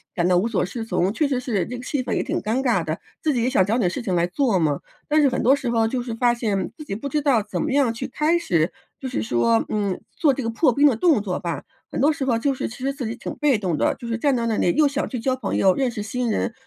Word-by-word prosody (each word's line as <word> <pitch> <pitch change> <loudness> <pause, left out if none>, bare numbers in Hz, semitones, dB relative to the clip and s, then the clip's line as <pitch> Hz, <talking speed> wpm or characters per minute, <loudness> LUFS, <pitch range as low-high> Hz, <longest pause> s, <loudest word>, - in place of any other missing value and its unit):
感 175 -1 +1
到 180 -1 +4
无 200 - +2
所 230 -4 0
适 225 +5 -5
从， 195 -3 0
确 295 +6 +1
实 265 -3 0
是 220 -8 -1
这 250 - -6
个 245 - -8
气 275 +1 -1
氛 - - -3
也 - - +1
挺 - - -2
尴 225 +5 0
尬 235 -10 +2
的， 155 0 -3 0.2
自 305 - +2
己 240 - 0
也 250 - +2
想 190 -8 +3
找 215 - 0
点 180 -5 +2
事 245 - -4
情 190 - -1
来 170 - +2
做 230 0 +1
嘛。 150 -4 +1 0.3
但 305 +1 +4
是 285 - +5
很 255 - -1
多 265 +4 +5
时 270 -3 -3
候， 225 -1 +2
就 245 +2 -2
是 240 - -5
发 240 0 +3
现 215 -5 -2
自 305 - -8
己 195 - -4
不 280 +7 -5
知 300 - 0
道 270 -7 +3
怎 210 - -4
么 310 - -1
样 270 -5 +3
去 260 +3 -5
开 305 +6 +1
始， 170 - +1 0.3
就 265 - -5
是 110 - -2
说， 115 0 +2
嗯， 200 -3 -1 0.2
做 295 -4 +3
这 265 - -3
个 230 - -2
破 250 +5 +3
冰 285 +4 +5
的 265 - +3
动 290 - +3
作 190 -3 -3
吧， 170 -3 -4 0.3
很 - - -3
多 290 +4 +4
时 290 - -4
候 240 -3 +2
就 275 +3 +1
是 - - -3
其 225 - -10
实 270 +2 -2
自 270 -4 -5
己 225 +1 -3
挺 - - -6
被 290 -5 +2
动 180 -7 -1
的， - - +2
就 235 - -9
是 230 0 -1
站 280 +2 +2
在 235 -1 -1
那 220 -2 0
里 175 - +2
又 305 -1 +5
想 280 +1 -2
去 250 - -4
交 255 +3 0
朋 245 -6 -3
友 190 -1 +4
认 260 -3 0
识 215 -3 -5
新 240 +3 -2
人， 230 - -1
235 Hz, 335 characters per minute, -23 LUFS, 200-270 Hz, 0.3 s, 是